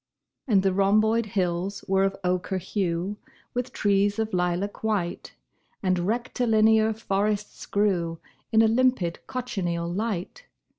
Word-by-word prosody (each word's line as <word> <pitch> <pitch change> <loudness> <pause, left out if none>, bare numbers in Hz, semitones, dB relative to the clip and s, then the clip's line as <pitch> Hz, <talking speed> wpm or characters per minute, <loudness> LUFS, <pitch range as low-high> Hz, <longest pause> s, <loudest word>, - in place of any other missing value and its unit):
And 200 -6 +4
the 190 -1 +2
rhomboid 215 +4 +3
hills 185 0 -2
were 195 0 +3
of 195 0 +1
ochre 180 +1 0
hue 185 +1 -2 0.4
With 245 +1 -2
trees 205 0 +2
of 220 -1 -2
lilac 180 +4 -1
white, 205 -6 -2 0.5
And 185 -1 +1
rectilinear 220 -2 +3
forests 210 -1 -2
grew 180 -5 +1 0.3
In 225 0 +5
a - - +5
limpid 225 -7 +2
cochineal 180 -9 -2
light. 215 - -3
200 Hz, 120 wpm, -26 LUFS, 185-220 Hz, 0.5 s, In